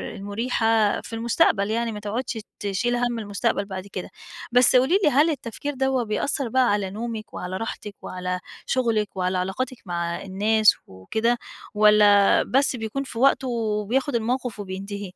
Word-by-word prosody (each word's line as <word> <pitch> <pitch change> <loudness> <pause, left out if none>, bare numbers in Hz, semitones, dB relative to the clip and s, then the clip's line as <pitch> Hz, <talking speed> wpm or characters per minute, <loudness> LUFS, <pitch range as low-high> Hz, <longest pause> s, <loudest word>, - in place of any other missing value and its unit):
المُريحة 220 +1 +1
في - - -11
المستقبل، 220 -3 +2
يعني 230 0 0
ما 210 - -6
تقعدش 225 +3 -3 0.2
تشيل 205 +5 -1
هَم 240 -1 -1
المستقبل 200 -1 -1
بعد 190 0 -7
كده. 190 -2 -6 0.4
بس 250 +1 +5
قولي 270 +10 +4
لي، 300 - +5
هل 295 +5 +4
التفكير 285 +1 -4
دَوّة 265 -1 0
بيأثّر 235 +4 -1
بقى 255 +1 +3
على 200 -2 0
نومِك، 220 +1 -6
وعلى 185 +1 -4
راحتِك، 210 -2 -6
وعلى 180 0 -4 0.3
شغلِك 230 -5 +1
وعلى 185 0 0
علاقاتِك 235 +8 -3
مع 170 -1 -3
الناس 210 +3 +3
وكده 220 - -1 0.4
والّا 210 -1 +5
بس 270 0 +1
بيكون 225 +4 -3
في 235 -3 -7
وقتُه 270 0 +3
وبياخُد 230 +3 -1
الموقف 240 -1 -2
وبينتهي؟ 200 +1 -6
220 Hz, 150 wpm, -24 LUFS, 200-245 Hz, 0.4 s, بس